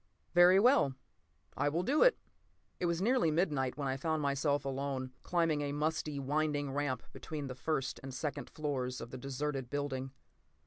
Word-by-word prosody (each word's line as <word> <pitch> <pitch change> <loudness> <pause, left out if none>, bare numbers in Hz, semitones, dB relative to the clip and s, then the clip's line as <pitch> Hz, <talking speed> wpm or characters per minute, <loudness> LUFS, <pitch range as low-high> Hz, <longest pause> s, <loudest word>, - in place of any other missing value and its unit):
"Very 175 +2 +7
well, 225 - +4 0.6
I 145 - +1
will 165 +4 0
do 285 +10 +2
it!" - - +6 0.6
It 175 - +1
was 170 +2 0
nearly 245 -6 +3
midnight 150 -6 0
when 140 -2 -2
I 130 0 -1
found 160 +3 0
myself 140 +1 +1
alone, 135 -1 -3
climbing 165 -4 +1
a 145 -1 -2
musty, 150 0 -1
winding 145 0 0
ramp 140 -2 -1
between 150 -3 -5
the 130 - -5
first 135 +1 -2
and 135 - -7
second 140 +3 -4
floors 130 -5 -3
of 115 +1 -8
the 130 - -6
deserted 135 0 -3
building. 135 -2 -3
145 Hz, 170 wpm, -33 LUFS, 135-160 Hz, 0.6 s, Very